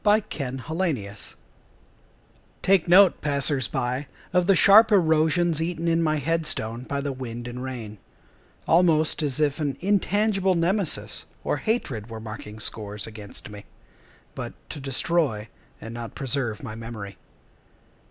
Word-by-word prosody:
The 210 0 +6 0.2
Circuit 130 -3 -4 0.3
Judge 100 -1 -7 1.3
Take 190 -2 +4
note, 185 +1 +6
passers 140 -3 +1
by, 125 +3 -2 0.3
of 180 -1 +3
the 195 - +6
sharp 220 +5 +7
erosions 160 -2 +3
Eaten 170 0 -2
in 165 0 +2
my 155 -1 +2
head 160 +2 0
stone 115 +3 -1
by 140 +1 -2
the 140 -1 -3
wind 120 -2 -6
and 120 +1 -6
rain— 115 -5 -6 0.7
Almost 165 -2 +3
as 145 -1 -1
if 145 -1 +1
an 145 -3 -2
intangible 200 0 +2
Nemesis 180 +3 0 0.2
or - - 0
hatred 135 - -2
Were 110 -1 -7
marking 110 -1 -8
scores 105 -1 -4
against 105 -1 -7
me, 105 -1 -10 0.7
But - - -6 0.2
to - - -7
destroy, 135 -4 -1 0.3
and 115 - -8
not 115 -1 -7
preserve, 130 -5 -2
my 110 - -6
memory. 110 -4 -8
140 Hz, 140 wpm, -25 LUFS, 115-170 Hz, 1.3 s, sharp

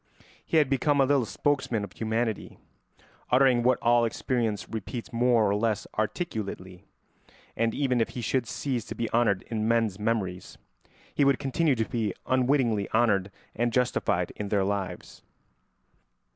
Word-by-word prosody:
He 160 - 0
had 150 -3 +4
become 140 +2 +1
a 135 - +5
little 135 -4 +2
spokesman 130 -7 -1
of 100 - -7
humanity, 110 -1 -2 0.7
uttering 125 -1 +4
what 125 +1 +3
all 120 0 +4
experience 115 -2 -1
repeats 115 +3 -6
more 120 -2 +3
or 100 - +1
less 105 -1 0
articulately; 105 - -4 0.7
and 115 0 0
even 130 -4 +1
if - - 0
he - - -2
should 120 +1 0
cease 130 -5 -2
to - - -7
be 115 - -3
honoured 115 -5 +2
in 110 -1 -1
men's 115 -4 +1
memories, 105 -5 -2 0.6
he - - +2
would 140 -1 +4
continue 145 +1 +1
to 110 -1 0
be 110 -5 -2
unwittingly 125 -5 +1
honoured 105 -4 +2 0.3
and 120 +1 0
justified 125 +1 0
in 105 -1 -5
their 100 -2 +2
lives. 100 -1 -4
115 Hz, 150 wpm, -27 LUFS, 105-130 Hz, 0.7 s, a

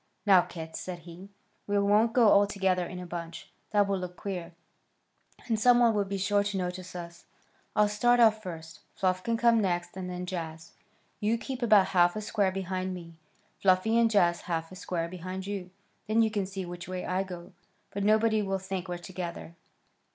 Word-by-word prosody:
"Now, 190 -3 +7
kits," 160 -2 -7
said 180 -1 -5
he, 175 +4 -12 0.4
"we 205 0 +1
won't 205 +3 +3
go 235 -4 +6
all 200 0 +5
together 190 -3 0
in 180 - -8
a 180 - -6
bunch. 170 -1 -7 0.2
That 205 -2 +3
would 195 -1 0
look 180 0 -7
queer, 180 -4 -5 0.9
and 225 -3 0
some 245 +2 +6
one 235 -2 +5
would 200 -2 0
be 200 - -2
sure 200 +2 +2
to 205 -1 -2
notice 180 0 -4
us. 170 -1 -8 0.5
I'll 210 0 +5
start 240 +4 +3
off 220 -2 +5
first; 165 -4 -8 0.2
Fluff 185 -1 0
can 230 0 0
come 235 -1 +4
next, 175 -3 -1
and 185 -1 -5
then 180 0 -4
Jaz. 160 -3 -6 0.5
You 215 +2 +1
keep 260 +2 -6
about 210 -5 +5
half 175 -1 +4
a 215 - -3
square 205 -2 0
behind 185 0 -3
me, 170 -2 -10 0.5
Fluffy, 190 +4 +3
and 230 -1 +4
Jaz 175 -5 +3
about - - -15
half 165 -1 -3
a - - -9
square 175 -3 -3
behind 185 +2 -6
you. 195 -2 -5 0.4
Then 225 +2 +3
you 220 - +1
can 200 -3 -1
see 190 -1 -5
which 175 0 -8
way 185 0 -4
I 185 +1 0
go, 180 -1 -8 0.4
but 200 - -3
nobody 215 +1 +3
will 195 -1 -1
think 190 -1 -5
we're 175 0 -3
together." 175 -2 -7
190 Hz, 200 wpm, -29 LUFS, 180-210 Hz, 0.9 s, Now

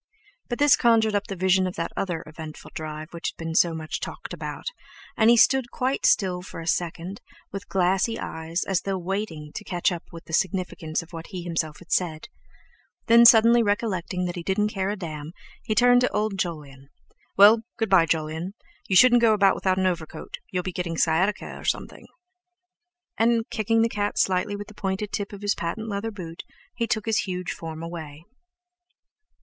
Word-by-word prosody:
But 240 - -2
this 290 0 +6
conjured 225 -3 +3
up 205 0 0
the 195 - -5
vision 185 +1 +2
of 185 - -5
that 165 - -3
other 175 -4 -2
eventful 155 0 -10
drive 155 0 -6
which 170 - -4
had - - -14
been 165 0 -4
so 165 0 +3
much 155 -1 -4
talked - - -7
about, - - -6 0.5
and 220 0 +4
he 235 - +6
stood 265 +1 +4
quite 260 +3 0
still 185 -3 +2
for 180 - -9
a 165 - -7
second, 175 +3 -2 0.3
with 195 0 -7
glassy 190 +5 +1
eyes, 160 +2 -3
as 195 -2 0
though 195 -1 -2
waiting 175 -5 -4
to 215 - -6
catch 180 -2 0
up 175 -2 -5
with 165 -1 -11
the 160 - -11
significance 175 -3 -1
of 170 +1 -19
what 165 0 -7
he 185 -4 -6
himself 165 -3 -2
had 180 - -16
said; 160 -4 -1 0.8
then, 235 +1 +7
suddenly 230 +1 +7
recollecting 205 -4 -1
that 175 - -3
he 175 - -4
didn't 195 +4 0
care 195 -1 -1
a 205 - -1
damn, 155 -4 -7 0.3
he 215 -1 -2
turned 245 +2 +5
to 250 - +2
old 210 0 -1
Jolyon: 145 -7 -5 0.5
"Well, 210 +3 +8 0.2
good 225 -3 -1
bye, 175 -4 +6
Jolyon! 160 +4 -2 0.3
You 190 - +1
shouldn't 245 +3 +7
go 225 -2 +5
about 195 -2 +4
without 185 -1 0
an 190 - +1
overcoat; 170 -4 -3
you'll 180 -1 -1
be 185 - -3
getting 170 -1 -3
sciatica 175 +7 +1
or - - -11
something!" - - -3 1.1
And, 230 0 +2
kicking 225 0 +2
the - - +3
cat 205 -2 -2
slightly 190 +2 +1
with 205 0 -6
the - - -13
pointed 195 0 -3
tip 205 -1 -3
of 200 0 -10
his 205 0 +2
patent 220 +7 -4
leather 200 +2 -2
boot, 175 -6 -8 0.3
he 235 -1 -2
took 215 -2 -1
his 225 -1 +1
huge 180 -2 -3
form 160 0 -7
away. 160 -3 -8
190 Hz, 195 wpm, -25 LUFS, 165-215 Hz, 1.1 s, Well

